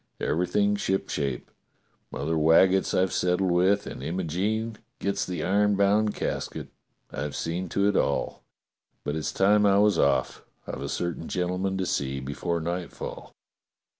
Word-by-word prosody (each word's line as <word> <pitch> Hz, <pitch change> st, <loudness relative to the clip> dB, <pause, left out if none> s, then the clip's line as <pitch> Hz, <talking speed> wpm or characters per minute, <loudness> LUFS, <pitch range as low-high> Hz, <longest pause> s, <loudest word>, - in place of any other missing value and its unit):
Everything 90 Hz, +5 st, +1 dB
shipshape. 85 Hz, -10 st, -2 dB, 0.6 s
Mother 80 Hz, +4 st, -2 dB
Waggetts 85 Hz, +5 st, +4 dB
I've 95 Hz, 0 st, +1 dB
settled 90 Hz, +1 st, +1 dB
with, 95 Hz, +4 st, +3 dB
and -, -, -7 dB
Imogene 95 Hz, +8 st, -2 dB, 0.2 s
gets 100 Hz, +1 st, -1 dB
the 90 Hz, -4 st, -3 dB
iron 100 Hz, +2 st, +3 dB
bound 105 Hz, +2 st, +2 dB
casket. -, -, -4 dB, 0.4 s
I've 75 Hz, +1 st, -4 dB
seen 85 Hz, +2 st, -3 dB
to 100 Hz, +4 st, +1 dB
it 105 Hz, -, +1 dB
all. 70 Hz, -, 0 dB, 0.6 s
But 75 Hz, -, -2 dB
it's 80 Hz, -, -2 dB
time 105 Hz, +2 st, +4 dB
I 100 Hz, -1 st, +5 dB
was 105 Hz, -3 st, +4 dB
off. 65 Hz, -2 st, +1 dB, 0.2 s
I've -, -, -6 dB
a -, -, -4 dB
certain 85 Hz, -1 st, -3 dB
gentleman 90 Hz, +2 st, -1 dB
to 95 Hz, -, -1 dB
see 70 Hz, -4 st, -1 dB
before 70 Hz, +6 st, -3 dB
nightfall." 85 Hz, +2 st, -5 dB
90 Hz, 140 wpm, -26 LUFS, 80-100 Hz, 0.6 s, I